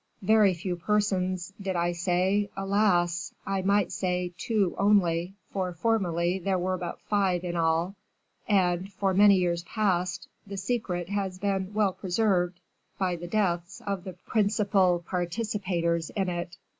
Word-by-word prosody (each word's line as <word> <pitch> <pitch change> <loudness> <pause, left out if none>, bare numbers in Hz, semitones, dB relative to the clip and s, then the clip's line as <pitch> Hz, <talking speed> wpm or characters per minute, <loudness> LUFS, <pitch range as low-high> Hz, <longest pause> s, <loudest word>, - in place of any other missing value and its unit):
Very 210 -2 +5
few 175 +1 -3
persons, 185 -1 0
did 190 -1 -2
I 175 0 +1
say, 185 +3 +1
alas! 195 -3 +1
I 195 -1 -1
might 200 0 +2
say 180 -1 -1
two 200 -1 0
only, 190 -3 +2 0.2
for 185 -2 -2
formerly 175 -3 0
there 190 +1 0
were 185 +1 -1
but 175 -1 -5
five 190 -4 +1
in 175 -1 -3
all, 165 +2 +1 0.6
and, 185 -1 +2
for 195 0 0
many 200 +1 +7
years 175 -2 +1
past, 185 -1 -1 0.2
the 200 0 -6
secret 190 -4 -2
has 195 -2 -2
been 195 0 -2
well 205 -3 +2
preserved 180 -2 0 0.4
by 185 -2 0
the 175 +1 -7
deaths 175 -3 -1
of 195 -3 -2
the 190 -2 -7
principal 195 -2 +1
participators 175 -3 -1
in 195 -3 -1
it. 175 0 -4
185 Hz, 145 wpm, -28 LUFS, 175-200 Hz, 0.6 s, many